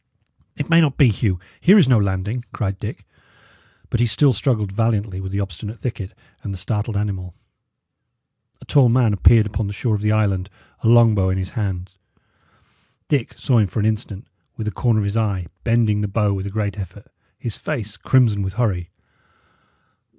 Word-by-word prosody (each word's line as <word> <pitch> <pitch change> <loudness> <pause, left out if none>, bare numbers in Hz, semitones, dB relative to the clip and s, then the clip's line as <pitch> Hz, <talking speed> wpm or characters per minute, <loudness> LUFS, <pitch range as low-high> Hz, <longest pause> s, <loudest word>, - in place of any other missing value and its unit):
"It 145 - -3
may 165 0 +5
not 145 -4 +1
be, 140 -5 +6
Hugh; 100 -3 0 0.2
here 195 +5 +6
is 175 -9 +6
no 125 -4 +5
landing," 100 +4 -2
cried 95 -3 -3
Dick; - - -7 0.9
but 120 - 0
he 120 - +3
still 130 +5 +3
struggled 105 -3 0
valiantly 105 -3 -1
with 95 0 -6
the 100 - -2
obstinate 100 +3 -5
thicket 110 -6 -5 0.3
and 100 - -5
the 95 - -5
startled 105 +2 -2
animal. 95 -4 -3 1.3
A - - -13
tall 135 -4 +4
man 120 -3 +3
appeared 110 +3 +5
upon 105 0 -3
the 100 - -4
shore 115 +2 -1
of 105 - -1
the 105 0 +1
island, 100 -3 +1 0.3
a - - -1
long 115 -1 +6
bow 95 -2 +1
in 95 - 0
his 95 -1 -4
hand. 95 -5 -3 1.2
Dick 140 -6 0
saw 125 -4 +2
him 105 - +3
for 95 - -4
an 105 - +1
instant, 110 -1 -2 0.3
with 110 - -4
the 105 - -2
corner 115 -2 +1
of - - -1
his 100 +1 -2
eye, 100 -5 0 0.2
bending 115 -3 +2
the 105 - -1
bow 105 0 +1
with 95 0 -4
a - - -3
great 105 0 -3
effort, 95 - -8 0.3
his 115 -4 -5
face 110 -9 -5
crimson 115 -2 +2
with 95 -1 -3
hurry. 95 -7 -1
105 Hz, 190 wpm, -21 LUFS, 100-115 Hz, 1.3 s, be